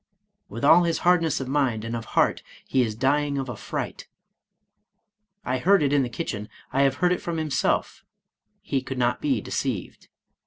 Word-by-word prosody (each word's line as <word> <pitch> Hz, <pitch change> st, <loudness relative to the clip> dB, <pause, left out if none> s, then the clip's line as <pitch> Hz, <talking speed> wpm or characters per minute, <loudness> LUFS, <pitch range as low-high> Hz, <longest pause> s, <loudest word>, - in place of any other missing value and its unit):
" -, -, -52 dB
With 115 Hz, +6 st, -4 dB
all 165 Hz, +4 st, +7 dB
his 165 Hz, -1 st, 0 dB
hardness 170 Hz, -4 st, +3 dB
of 135 Hz, -, -4 dB
mind, 130 Hz, -6 st, 0 dB
and 115 Hz, +1 st, -3 dB
of 115 Hz, -1 st, -5 dB
heart, -, -, +3 dB, 0.2 s
he 130 Hz, -, +1 dB
is 110 Hz, -3 st, -1 dB
dying 140 Hz, +4 st, +1 dB
of 135 Hz, -1 st, -2 dB
a 120 Hz, -, -4 dB
fright. -, -, -5 dB, 1.4 s
I 130 Hz, +1 st, -1 dB
heard 190 Hz, +3 st, +4 dB
it 140 Hz, 0 st, +1 dB
in 145 Hz, -, +4 dB
the 125 Hz, -, -2 dB
kitchen, 105 Hz, -2 st, -5 dB, 0.2 s
I 135 Hz, -, +2 dB
have 135 Hz, -1 st, +3 dB
heard 180 Hz, +5 st, +2 dB
it 180 Hz, -, 0 dB
from 170 Hz, -1 st, -3 dB
himself, 155 Hz, -3 st, -1 dB, 0.3 s
— -, -, -50 dB
he 135 Hz, -, -1 dB
could 135 Hz, 0 st, -6 dB
not 120 Hz, -1 st, +1 dB
be 285 Hz, -3 st, +1 dB
deceived. -, -, -4 dB
135 Hz, 195 wpm, -25 LUFS, 125-160 Hz, 1.4 s, all